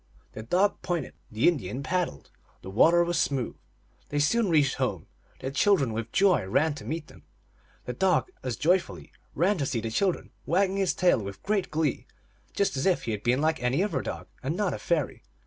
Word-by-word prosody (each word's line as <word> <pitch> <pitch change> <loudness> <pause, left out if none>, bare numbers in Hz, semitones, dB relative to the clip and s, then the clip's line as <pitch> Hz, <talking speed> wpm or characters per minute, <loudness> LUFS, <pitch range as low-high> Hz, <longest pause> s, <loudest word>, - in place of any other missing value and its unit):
The 110 - -6
dog 185 - +1
pointed, 170 -6 -3 0.2
the 110 +1 +1
Indian 135 - 0
paddled, 170 - -2 0.3
the 95 - -7
water 170 - +5
was 170 -1 0
smooth. 135 -7 -1 0.5
They 145 - -2
soon 200 +9 +2
reached 150 -5 +3
home; 105 -11 -2 0.4
the 130 - -3
children 140 - +3
with 115 +1 -4
joy 190 - +3
ran 150 +10 +2
to 145 - -10
meet 160 0 -3
them; - - -16 0.6
the 125 - -3
dog 190 - +1
as 125 -3 -3
joyfully 175 - 0 0.2
ran 185 +2 +2
to 140 - 0
see 125 -3 -1
the 110 0 -4
chil 185 - +2
dren, - - -12 0.2
wagging 190 +2 +2
his 195 -2 +1
tail 175 -10 +3
with 100 -1 -8
great 200 -2 0
glee, 150 -3 -1 0.4
just 200 - 0
as 135 - 0
if 185 - +2
he 115 - -2
had 105 -2 -3
been 125 +5 +1
like 160 -1 +1
any 125 +8 +1
other 165 -11 -1
dog, - - -5 0.2
and 150 +7 -2
not 205 -3 0
a - - -5
fairy. 170 -6 -1
155 Hz, 200 wpm, -27 LUFS, 125-180 Hz, 0.6 s, water